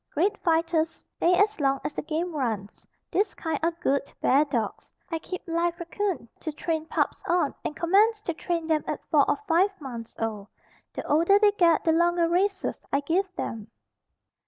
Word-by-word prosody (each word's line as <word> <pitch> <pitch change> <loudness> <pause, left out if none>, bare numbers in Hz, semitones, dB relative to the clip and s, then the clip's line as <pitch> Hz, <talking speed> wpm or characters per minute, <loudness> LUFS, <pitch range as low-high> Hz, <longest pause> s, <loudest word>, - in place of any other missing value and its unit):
Great 385 +7 +2
fighters, 330 -1 +2
stay 350 +1 0
as 415 +1 +2
long 275 -1 +2
as - - -3
the - - -3
game 325 +2 -3
runs. 220 -7 -3 0.2
This 405 +3 +1
kind 320 -3 -2
are 330 - +3
good 280 -5 -1
bear 280 +3 +4
dogs. 235 -7 -3 0.2
I 325 - -1
keep 365 +3 -6
live 340 0 0 0.2
'coon 400 - -2
to 315 - -4
train 320 +1 -3
pups - - -1
on 345 -5 +2
and 300 - -3
commence 420 +6 +3
to 340 - -2
train 335 0 -2
them 315 -1 +1
at - - -2
4 - - +4
or - - +2
5 365 +3 +4
months 240 -6 -8
old. 215 -3 -3 0.4
The - - -6
older 335 +7 +4
they 415 0 +5
get 340 -5 +3
the 325 - +3
longer 345 +1 +3
races 380 +3 0
I 280 - +2
give 360 +7 0
them. 220 -8 -5
330 Hz, 180 wpm, -26 LUFS, 290-360 Hz, 0.4 s, they